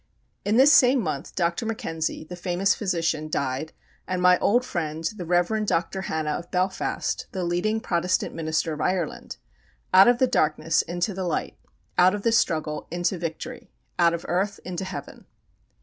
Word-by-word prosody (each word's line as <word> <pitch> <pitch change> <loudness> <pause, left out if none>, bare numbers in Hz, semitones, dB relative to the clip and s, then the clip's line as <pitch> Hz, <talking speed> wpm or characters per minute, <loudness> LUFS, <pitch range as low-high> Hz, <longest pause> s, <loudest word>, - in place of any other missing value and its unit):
In 210 +2 +1
this 275 +3 +7
same 260 0 +6
month 155 - -4
Dr. 170 +2 0
Mackenzie, 165 -10 -3
the 180 +3 -9
famous 180 +2 +1
physician, 165 -6 -1
died, 140 +1 -2 0.4
and 185 -1 -1
my 180 0 +5
old 245 +4 +2
friend, 160 -7 -3
the 175 0 -4
Rev. 180 +5 +2
Dr. 190 +2 -1
Hanna 155 -1 -2
of 170 +3 -5
Belfast, 185 +1 -1
the 185 -2 -2
leading 180 +6 0
Protestant 180 -3 0
minister 160 0 -1
of 150 - -5
Ireland. 180 -4 -2 0.6
Out 190 +3 +8
of 245 0 +5
the 260 - +4
darkness 155 -7 +1
into 175 +4 -2
the 185 0 -3
light; 170 - -2 0.4
out 185 +3 +6
of 205 - -6
the 230 - +3
struggle 155 -8 0
into 175 +2 -1
victory; 165 -2 -6 0.3
out 170 -1 +4
of 170 - -8
earth 195 +4 -1
into 185 +1 -4
Heaven! 185 - -8
175 Hz, 165 wpm, -25 LUFS, 165-195 Hz, 0.6 s, Out